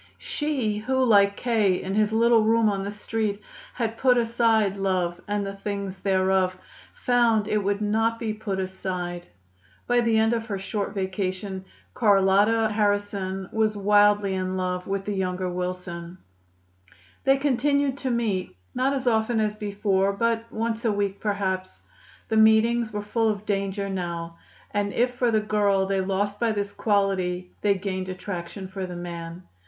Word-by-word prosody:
She 265 -9 -2
who, 260 +4 +1
like 200 -3 +4
K. 215 -7 +2
in 190 - -4
his 210 0 +2
little 230 0 +4
room 225 0 +3
on 195 -1 -2
the 200 - -3
Street, 210 0 -2 0.4
had 225 -2 -2
put 250 -2 +4
aside 230 -3 +2
love 185 -3 -1
and 205 0 -1
the 195 - -4
things 200 -1 -5
thereof, 190 -1 +1 0.4
found 235 -4 +2
that - - -5
it - - +3
would 200 +1 0
not 225 +2 +1
be 225 -2 -3
put 200 -3 -4
aside. 180 -2 -4 0.6
By 245 0 +3
the 230 -1 +2
end 220 +1 +3
of 225 -1 -2
her 200 -3 -2
short 200 +1 -4
vacation 190 0 -3 0.3
Carlotta 205 +1 +4
Harrison 205 -2 -1
was 215 -1 +1
wildly 205 0 +4
in 185 0 -2
love 180 -1 -2
with 195 0 -2
the 210 - -2
younger 185 -1 -2
Wilson. 180 -1 -5 1.1
They 270 0 +4
continued 280 0 +1
to 265 - -2
meet, 215 - -1 0.2
not 260 +2 +1
as 270 -1 -2
often 225 -1 +2
as 210 -1 0
before, 200 -2 0
but 230 +2 -1
once 225 +1 -2
a 225 - +2
week, 200 -1 -1
perhaps. 190 -3 -2 0.4
The 220 - 0
meetings 220 +1 +4
were 210 -1 -4
full 225 +2 +1
of 210 -1 -3
danger 200 -1 -1
now; 170 -3 -4 0.3
and 205 -1 -1
if 245 +1 +2
for 245 -1 +1
the 220 -1 +2
girl 205 -2 +2
they 195 0 0
lost 200 +2 -1
by 230 -2 +1
this 200 -1 -2
quality, 190 -4 0
they 205 -1 +3
gained 190 -1 -4
attraction 185 0 -6
for 190 0 -5
the 180 - -7
man. 170 0 -7
205 Hz, 165 wpm, -25 LUFS, 190-225 Hz, 1.1 s, like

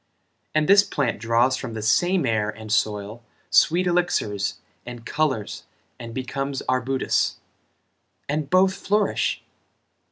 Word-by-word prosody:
And 155 -1 +2
this 200 0 +8
plant 140 - -2
draws 120 +3 +2
from 125 -4 -6
the 110 - -5
same 175 - +2
air 110 -3 0
and 110 0 -8
soil 105 +1 -1 0.3
Sweet 175 +3 +4
elixirs 170 - 0 0.3
and 120 -1 -9
colors 145 -8 -2 0.3
and 115 -1 -8
becomes 135 +3 -4
arbutus? 130 +1 0 0.9
And 145 0 -2
both 190 +2 +4
flourish? 200 +1 0
130 Hz, 120 wpm, -23 LUFS, 110-165 Hz, 0.9 s, this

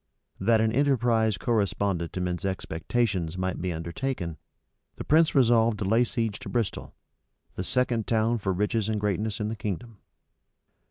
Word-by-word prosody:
That 115 -1 +3
an 110 0 +2
enterprise 120 -5 +2
correspondent 100 -6 0
to 90 - -3
men's 90 +1 -2
expectations 95 0 -1
might 95 0 -2
be 90 0 -1
undertaken, 85 +1 -4 0.6
the - - -6
prince 160 +1 +3
resolved 115 -4 +4
to 100 - -3
lay 115 +5 +4
siege 115 -4 -2
to - - -8
Bristol, 115 -5 -2 0.6
the 90 - -4
second 125 0 0
town 115 +1 +2
for 95 -2 -1
riches 105 +3 0
and 110 -1 0
greatness 105 +1 -1
in 105 0 -1
the 110 - -3
kingdom. 105 +1 -5
110 Hz, 155 wpm, -27 LUFS, 95-115 Hz, 0.6 s, resolved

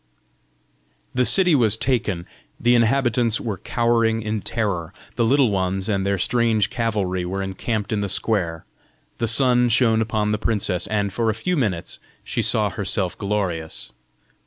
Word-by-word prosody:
The 125 0 +2
city 180 +2 +5
was 115 -6 +3
taken; 110 -9 -1 0.3
the 120 +1 +3
inhabitants 120 -1 +2
were 105 -6 -4
cowering 115 0 +1
in 110 0 -2
terror; 100 -9 -3 0.2
the - - +1
Little 130 0 +3
Ones 95 0 -1
and 100 -3 0
their 100 0 0
strange 115 +1 +1
cavalry 105 -7 -1
were 95 +2 -3
encamped 105 +3 -3
in 105 - 0
the 100 - -2
square; 90 -5 -1 0.5
the 115 - 0
sun 125 +1 +3
shone 115 -1 +3
upon 110 -1 -1
the 105 - -1
princess, 100 -5 -1
and 100 -2 -1
for 115 0 0
a 110 - 0
few 180 +10 -1
minutes 100 - -2 0.2
she - - -2
saw - - +2
herself - - -1
glorious. 95 -6 -3
110 Hz, 155 wpm, -22 LUFS, 95-120 Hz, 0.5 s, city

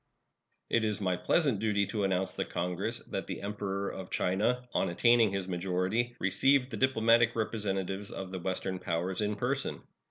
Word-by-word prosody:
It 115 - +3
is 105 -1 0
my 95 -3 +1
pleasant 135 - +2
duty 105 -2 +1
to 105 0 -2
announce 95 -1 0
to - - +1
Congress 90 0 -2
that - - -3
the - - -4
Emperor 100 -1 -3
of 95 -1 -7
China, 120 +7 0
on - - +1
attaining 115 +4 +4
his 95 -1 -2
majority, 95 +6 -1
received 130 +7 +3
the 110 - -4
diplomatic 115 -1 +4
representatives 100 -3 -2
of 95 -1 -6
the 95 - -4
Western 95 +1 -2
powers 90 +2 -2
in 105 0 0
person. 125 +6 -2
100 Hz, 165 wpm, -31 LUFS, 95-115 Hz, -, attaining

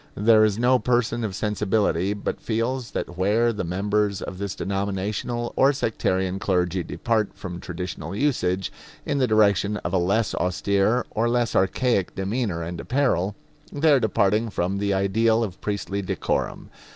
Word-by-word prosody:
There 110 +1 +5
is 105 -1 +2
no 125 +2 +4
person 120 -1 0
of 100 -4 -3
sensibility 105 -2 0
but 100 - -4
feels 120 +2 -2
that 90 +1 -5
where 110 +5 +2
the 105 - -3
members 100 +3 0
of 95 - -7
this 100 -1 -3
denominational 100 +4 -2
or 135 +1 +5
sectarian 95 -7 -1
clergy 90 -1 0
depart 110 +3 -1
from 95 -3 -7
traditional 90 +1 -6
usage, 100 -8 0 0.3
in 145 -2 0
the 130 - +3
direction 105 -2 +3
of 85 - -2
a 95 - +3
less 100 +5 +1
austere 100 +6 +1
or 115 +2 0
less 120 -1 0
archaic 95 +1 +1
demeanor 95 -3 -2
and 85 +1 -5
apparel, 115 -8 0 0.4
they 155 +2 +3
are 140 - +5
departing 110 0 +1
from 95 0 -1
the 100 0 0
ideal 110 +4 +2
of 95 -4 -6
priestly 100 -1 -2
decorum. 95 - -2
105 Hz, 155 wpm, -24 LUFS, 95-115 Hz, 0.4 s, There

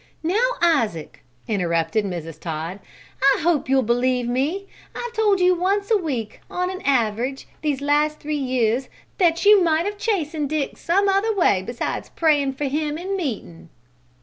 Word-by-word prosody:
"Now, 425 +10 +2
Isaac," 230 - 0 0.2
interrupted 175 0 0
Mrs. 165 -4 -6
Todd. 165 +3 -5 0.6
"I - - -4
hope 315 -5 +1
you'll 265 -1 +3
believe 245 +1 +1
me! 285 +11 -1 0.3
I've 485 -1 -5
told 420 -4 +2
you 365 0 +5
once 395 +4 0
a - - +6
week, 255 - -4
on 360 +1 -2
an 375 - -7
average, 250 0 0
these 290 -3 -1
last 295 +1 +1
three 305 +1 -4
years, 255 -2 0 0.3
that 335 -1 +2
you 415 -1 +7
might 325 0 +2
have 410 0 -4
chastened 320 -9 -1
Dick 305 -2 -2
some 390 +4 +1
other 400 +3 +2
way 205 - +3
besides 240 +5 -4
prayin' 295 -4 +2
for 270 +2 -4
him 295 +2 -1
in 380 +4 -3
meetin'!" 220 - -5
295 Hz, 160 wpm, -22 LUFS, 235-360 Hz, 0.6 s, you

